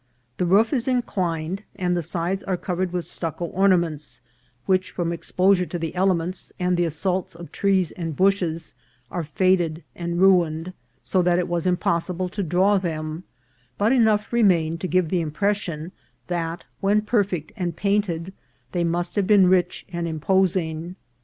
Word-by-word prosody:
The 180 - 0
roof 210 +7 +4
is 255 -2 0
inclined, 185 -8 -1
and 180 -2 0
the 175 - 0
sides 175 +4 -2
are 185 -2 -1
covered 180 0 -2
with 180 -1 -2
stucco 165 0 -4
orna 190 +1 +3
ments, 155 -4 -4 0.5
which, 185 -1 +1
from 170 -1 -2
exposure 180 +2 +2
to 175 - -4
the 165 -1 -4
elements, 180 -1 0
and 180 0 +1
the 175 0 +2
assaults 180 +3 -1
of 170 0 -10
trees 190 -4 +1
and 165 -4 -5
bushes, 180 -4 +1 0.4
are 175 - -2
faded 170 0 +1
and 170 0 -3
ruined, 175 -2 +3 0.3
so 185 - +1
that 175 0 +3
it 180 0 0
was 175 0 -1
impossible 180 0 0
to 200 - -4
draw 190 +3 +3
them; 160 -1 -4 0.5
but 210 +3 +2
enough 220 -4 +3
re 235 - +3
mained 165 -5 +3
to 185 - -3
give 180 -2 +1
the 180 -1 +1
impression 170 0 -2 0.3
that, 170 -1 -3 0.2
when 205 +2 +3
perfect 200 -8 0
and 175 -6 -3
painted, 190 -3 -1 0.4
they 175 -1 0
must 170 +1 -1
have 200 -3 +1
been 205 -3 +6
rich 180 -1 +2
and 170 0 -2
imposing. 170 0 0
180 Hz, 165 wpm, -23 LUFS, 170-190 Hz, 0.5 s, been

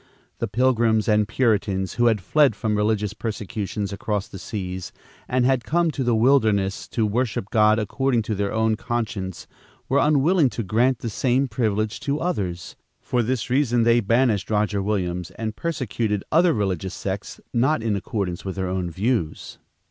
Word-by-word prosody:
The - - -1
Pilgrims 115 -3 +2
and 105 -1 +3
Puritans 100 -6 0
who 120 -1 +2
had 110 -4 +2
fled 140 - +3
from 105 0 -1
religious 105 -1 0
persecutions 105 -2 -4
across 100 0 -2
the 95 - -10
seas, 95 -3 -5 0.4
and 125 0 +1
had 130 -2 +2
come 170 +7 +1
to 135 - -3
the 120 -2 +2
wilderness 110 -6 +2
to 115 - 0
worship 105 -2 -1
God 110 0 +4
according 120 +3 0
to 110 - -2
their 100 0 -1
own 110 0 +1
conscience 110 -6 -4 0.4
were 140 - +2
unwilling 150 +1 +3
to 115 - -1
grant 120 +6 +2
the 115 - -3
same 130 +5 +1
privilege 110 -2 -1
to 145 +1 -2
others. 95 - -3 0.2
For 125 - 0
this 120 0 -2
reason 125 -3 +2
they 115 +1 +4
banished 115 -1 +1
Roger 105 -1 +1
Williams 90 -4 -2
and 110 -1 -3
persecuted 120 -10 -2
other 170 +2 +5
religious 95 - -2
sects 95 +1 -5
not 125 +1 +2
in 110 -3 0
accordance 100 -3 -3
with 95 -1 -4
their 95 -1 -2
own 90 -1 -2
views. 95 -2 -2
110 Hz, 165 wpm, -23 LUFS, 100-125 Hz, 0.4 s, other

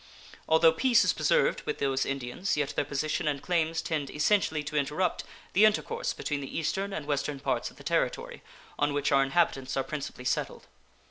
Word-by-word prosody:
Although 160 0 +6
peace 250 +2 +4
is - - +3
preserved - - +2
with - - -1
those 135 -1 0
Indians, 135 +7 -2
yet 145 -2 -1
their - - +1
position 145 +2 -2
and 145 -2 0
claims 165 0 0
tend 150 -4 -2
essentially 155 -1 +1
to 150 +1 -6
interrupt 150 +5 0 0.3
the 200 - +5
intercourse 335 - +2
between 145 -1 -3
the 135 - -6
eastern 190 +5 -1
and 155 -6 -4
western 145 -1 -2
parts - - -1
of - - -19
the - - -13
Territory, - - -1 0.4
on 145 0 +1
which 145 0 0
our 135 - +5
inhabitants 135 -2 +1
are 135 - +1
principally 140 -4 -6
settled. 130 - -2
150 Hz, 185 wpm, -29 LUFS, 140-175 Hz, 0.4 s, Although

